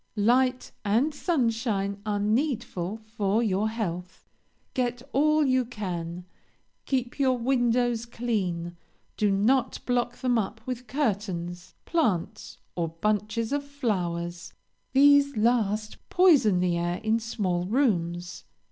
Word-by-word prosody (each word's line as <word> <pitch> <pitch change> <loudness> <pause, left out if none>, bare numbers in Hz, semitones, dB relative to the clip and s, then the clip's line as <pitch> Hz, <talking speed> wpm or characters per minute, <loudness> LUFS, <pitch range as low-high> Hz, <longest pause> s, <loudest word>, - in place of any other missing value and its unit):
"Light 250 +4 +2
and 235 +9 +2
sunshine 230 - 0
are 205 -1 0
needful 215 - -1
for 215 0 0
your 210 0 +1
health. 180 -5 -5 0.5
Get 245 -1 -1
all 305 +2 +3
you 260 -1 +3
can; 180 -7 -5 0.6
keep 255 -1 -1
your 260 -2 +3
windows 240 -1 +1
clean. 185 -8 -2 0.4
Do 210 - +2
not 235 +6 +2
block 245 -1 0
them 250 -2 +1
up 215 +1 -3
with 250 -1 -5
curtains, 185 - -2
plants, 225 - -1 0.2
or 170 -2 0
bunches 210 - -1
of 285 0 0
flowers; 175 -11 -3 0.4
these 280 -1 +5
last 215 -2 +1
poison 285 - +5
the 175 -1 +1
air, 175 +1 -1
in 220 +1 +2
small 185 -6 -2
rooms. 180 -8 0
220 Hz, 115 wpm, -27 LUFS, 185-250 Hz, 0.6 s, these